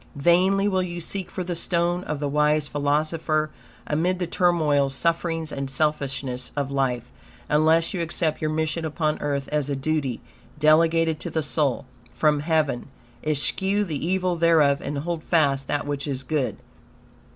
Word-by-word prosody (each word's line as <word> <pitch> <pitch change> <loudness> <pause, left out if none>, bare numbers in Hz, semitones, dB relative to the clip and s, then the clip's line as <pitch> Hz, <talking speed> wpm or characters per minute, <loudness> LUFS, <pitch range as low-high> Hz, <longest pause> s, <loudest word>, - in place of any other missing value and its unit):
Vainly 185 +6 +3
will 190 -2 +1
you 175 -1 -4
seek 185 +2 -4
for 185 - -4
this 175 -1 -3
stone 175 0 0
of 150 -1 -3
the 145 - -1
wise 150 +1 +2
philosopher 155 +2 0 0.3
amid 175 +5 0
the 180 - -1
turmoils, 155 -6 +2
sufferings, 165 0 -1
and 135 -1 -4
selfishness 135 -3 -2
of 140 -2 -2
life, 125 -3 -1 0.4
unless 160 +2 +3
you 180 - -2
accept 165 -1 -1
your 155 - 0
mission 160 +1 -1
upon 155 -1 -1
earth 140 -2 -1
as 150 -2 0
a 140 - 0
duty, 135 -3 -1 0.4
delegated 160 +1 +3
to - - -5
the 160 - -1
soul, 145 -3 0 0.3
from 150 -1 +3
Heaven. 150 -5 0 0.4
Eschew 190 +7 +1
the 155 -8 -4
evil 185 +1 0
thereof, 160 -4 +4
and 145 +1 -4
hold 165 +2 -3
fast 140 -5 +2
that 145 - -1
which 145 0 -3
is 135 -2 -3
good. 140 0 -1
155 Hz, 160 wpm, -24 LUFS, 145-170 Hz, 0.4 s, thereof